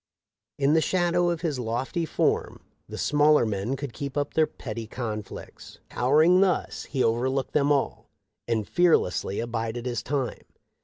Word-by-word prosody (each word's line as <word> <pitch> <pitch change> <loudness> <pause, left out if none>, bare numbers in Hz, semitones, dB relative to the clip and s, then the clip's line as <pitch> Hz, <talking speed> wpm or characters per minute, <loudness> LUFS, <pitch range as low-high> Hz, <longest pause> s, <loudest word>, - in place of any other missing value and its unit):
In 140 +1 +3
the 160 - +4
shadow 175 0 +1
of 170 -2 -2
his 155 -6 -2
lofty 125 +9 -2
form - - -1 0.3
the - - -7
smaller 150 -2 +4
men 105 +4 -2
could 135 -3 -6
keep 140 +2 -5
up 145 0 -1
their 155 -1 +3
petty 115 -2 -7
conflicts. 110 -3 -7
Towering 155 +9 +4
thus, 190 -2 0
he 135 -3 -1
overlooked 130 +4 0
them 145 0 +2
all, 140 -2 -1 0.4
and 110 -3 -1
fearlessly 165 - +2
abided 115 0 -3
his 120 -3 -2
time. 135 0 -3
135 Hz, 150 wpm, -26 LUFS, 115-155 Hz, 0.4 s, the